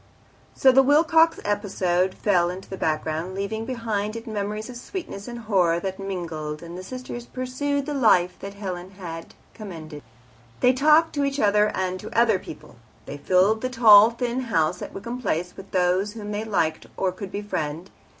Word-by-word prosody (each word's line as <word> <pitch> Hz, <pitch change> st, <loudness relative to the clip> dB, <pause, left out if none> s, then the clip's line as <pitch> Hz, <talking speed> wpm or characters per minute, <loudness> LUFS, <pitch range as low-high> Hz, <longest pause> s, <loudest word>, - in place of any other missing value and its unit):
So 265 Hz, -, +6 dB
the 265 Hz, +1 st, +6 dB
Wilcox 320 Hz, +4 st, +4 dB
episode 190 Hz, -3 st, 0 dB
fell 175 Hz, -4 st, +2 dB
into 185 Hz, +2 st, -7 dB
the 190 Hz, -, -6 dB
background, 160 Hz, +2 st, -2 dB
leaving 210 Hz, +3 st, -3 dB
behind 220 Hz, -4 st, -2 dB
it 230 Hz, 0 st, -7 dB
memories 210 Hz, 0 st, -4 dB
of 250 Hz, -, -9 dB
sweetness 250 Hz, -, -7 dB
and 240 Hz, 0 st, -6 dB
horror 190 Hz, -7 st, +1 dB
that 190 Hz, +1 st, -5 dB
mingled, 165 Hz, -5 st, -5 dB
and 170 Hz, +1 st, -8 dB
the 180 Hz, -, -6 dB
sisters 240 Hz, +3 st, -7 dB
pursued 275 Hz, +2 st, -2 dB
the 295 Hz, -, -3 dB
life 210 Hz, -9 st, +3 dB
that 200 Hz, 0 st, -8 dB
Helen 185 Hz, -3 st, -6 dB
had 165 Hz, -3 st, -8 dB, 0.2 s
commended. 160 Hz, -8 st, -9 dB, 0.6 s
They 250 Hz, -, +4 dB
talked 305 Hz, +5 st, +4 dB
to 285 Hz, -, 0 dB
each 275 Hz, 0 st, -1 dB
other 210 Hz, -1 st, +4 dB
and 185 Hz, 0 st, -2 dB
to 220 Hz, -, -2 dB
other 225 Hz, -5 st, +4 dB
people, 150 Hz, -, -11 dB, 0.3 s
they 145 Hz, -, -7 dB
filled 190 Hz, +7 st, +3 dB
the 255 Hz, -, -1 dB
tall 220 Hz, -3 st, +8 dB
thin 240 Hz, +1 st, -2 dB
house 180 Hz, -8 st, 0 dB
at -, -, -6 dB
Wickham 235 Hz, +5 st, -6 dB
Place 180 Hz, -5 st, -2 dB
with 195 Hz, -, -11 dB
those 185 Hz, +3 st, +1 dB
whom 210 Hz, -2 st, -7 dB
they 210 Hz, +1 st, -3 dB
liked 165 Hz, -7 st, -1 dB
or 190 Hz, -1 st, +1 dB
could 190 Hz, +1 st, -8 dB
befriend. 170 Hz, -4 st, -4 dB
205 Hz, 180 wpm, -24 LUFS, 180-240 Hz, 0.6 s, tall